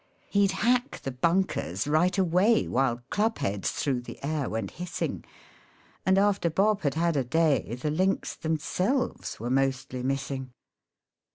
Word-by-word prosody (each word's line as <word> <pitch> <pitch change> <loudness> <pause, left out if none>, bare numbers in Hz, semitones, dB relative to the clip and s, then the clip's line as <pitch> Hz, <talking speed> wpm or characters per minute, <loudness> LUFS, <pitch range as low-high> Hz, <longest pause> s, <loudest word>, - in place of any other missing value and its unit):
He'd 200 -1 +3
hack 245 +6 +1
the 135 - -4
bunkers 170 +3 0
right 165 +6 +2
away 190 +5 +3
While 120 -2 0
club 220 +2 +1
heads 100 0 -1
through 130 -4 -1
the 120 - -9
air 145 -2 -1
went 110 +1 -3
hissing, 180 +1 -4 0.8
And 190 0 +5
after 200 -3 +3
Bob 205 +5 +2
had 140 -3 0
had 170 0 +1
a 135 - +2
day 135 - +1
The 140 +4 -2
links 185 +5 0
themselves 180 - -1
were 120 +3 -3
mostly 135 -1 0
missing. 135 -1 -3
155 Hz, 145 wpm, -27 LUFS, 130-195 Hz, 0.8 s, And